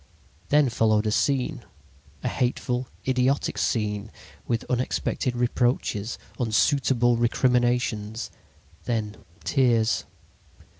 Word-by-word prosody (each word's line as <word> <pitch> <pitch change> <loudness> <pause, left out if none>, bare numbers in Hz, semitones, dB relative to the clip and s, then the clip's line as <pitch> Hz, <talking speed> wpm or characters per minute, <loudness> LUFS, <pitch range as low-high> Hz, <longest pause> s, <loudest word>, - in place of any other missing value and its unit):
"Then 145 -2 +4
followed 110 -2 +2
a 105 - +1
scene, 135 +3 0 0.6
a - - 0
hateful, 125 0 -1 0.2
idiotic 130 +2 +1
scene, 105 -1 -1 0.4
with 115 -1 -1
unexpected 125 0 -1
reproaches, 120 -3 0 0.2
unsuitable 120 +1 +2
recriminations, 120 -2 +1 0.5
then 110 -3 -2 0.3
tears. 120 -5 +2
120 Hz, 85 wpm, -25 LUFS, 110-125 Hz, 0.6 s, Then